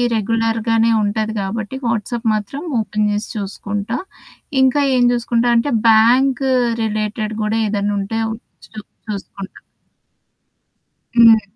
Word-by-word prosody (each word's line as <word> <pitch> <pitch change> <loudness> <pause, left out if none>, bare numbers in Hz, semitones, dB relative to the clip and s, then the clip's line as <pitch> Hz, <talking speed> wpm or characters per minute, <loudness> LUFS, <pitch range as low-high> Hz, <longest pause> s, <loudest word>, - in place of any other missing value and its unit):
రెగ్యులర్‌గానే 225 +1 +1
ఉంటది 215 +1 -1
కాబట్టి 215 +4 -4
వాట్సాప్ 230 +1 -2
మాత్రం 215 +8 -5 0.2
ఓపెన్ 210 -1 -1
చేసి 205 +1 -3
చూసుకుంటా. 205 +2 -4 0.6
ఇంకా 265 +2 +3
ఏం 245 - +3
జూసుకుంటా 240 0 0
అంటే 260 +5 0 0.2
బ్యాంక్ 245 +4 +4 0.4
రిలేటెడ్ 215 0 -2
గూడా 215 +1 0
ఏదన్నుంటే 205 +1 -2 0.5
చూ 220 - -16 0.3
చూసుకుంటా. 200 -1 -7 1.6
హ్మ్. 230 -2 +7
220 Hz, 100 wpm, -18 LUFS, 210-230 Hz, 1.6 s, హ్మ్